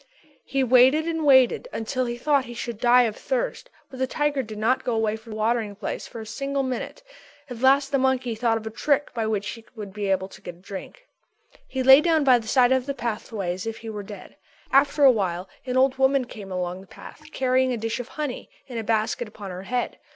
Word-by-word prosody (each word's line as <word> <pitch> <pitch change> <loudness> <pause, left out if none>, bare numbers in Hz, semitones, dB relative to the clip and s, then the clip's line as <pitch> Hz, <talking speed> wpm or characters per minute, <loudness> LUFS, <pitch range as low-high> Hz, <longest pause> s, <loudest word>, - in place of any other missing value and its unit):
He 270 0 0
waited 260 +5 +5
and 325 -1 -2
waited 265 - +5
until 255 +3 -2
he 240 0 -4
thought 280 +1 +2
he 240 - -9
should 235 -2 -5
die 245 +1 +5
of 220 -3 -1
thirst, - - -3 0.2
but 260 - -10
the 260 - +1
tiger 295 0 0
did 215 -3 -8
not 230 +5 +1
go 240 - -1
away 220 -1 0
from 220 0 -10
the - - -6
watering 220 -1 0
place - - -5
for 230 - -9
a 220 - -7
single 275 +5 -2
minute. 260 - -5 0.5
At 240 - -6
last 275 +2 +4
the 275 - +2
monkey 260 -2 +1
thought 225 0 +1
of 220 - -8
a 220 - -4
trick 285 +5 0
by 225 -2 -1
which 205 -2 -1
he 230 - -8
would 205 -3 -8
be 205 0 -3
able 190 0 +1
to - - -14
get 175 - -8
a - - -21
drink. 200 - -9 0.6
He 260 -1 -2
lay 265 +2 +9
down 320 -2 +2
by 255 -3 +5
the 220 - -10
side 250 +1 +4
of 260 0 +1
the 280 - -2
pathway 215 -6 -3
as 185 +4 -6
if 225 - -4
he 225 -1 -7
were 210 -1 -5
dead. 200 -1 -11 0.3
After 280 +2 +3
a 270 - +9
while 185 -5 -2 0.2
an 250 0 0
old 265 0 +3
woman 265 -1 +3
came 205 -5 -10
along 180 0 -3
the 195 - -16
path - - -13
carrying 260 0 +1
a 245 - -1
dish 225 +2 -3
of 245 - -5
honey 295 -3 -5 0.2
in 245 -3 -6
a - - -4
basket 225 +2 0
upon 205 -2 -9
her 180 +1 -6
head. 245 0 -2
240 Hz, 240 wpm, -24 LUFS, 215-265 Hz, 0.6 s, lay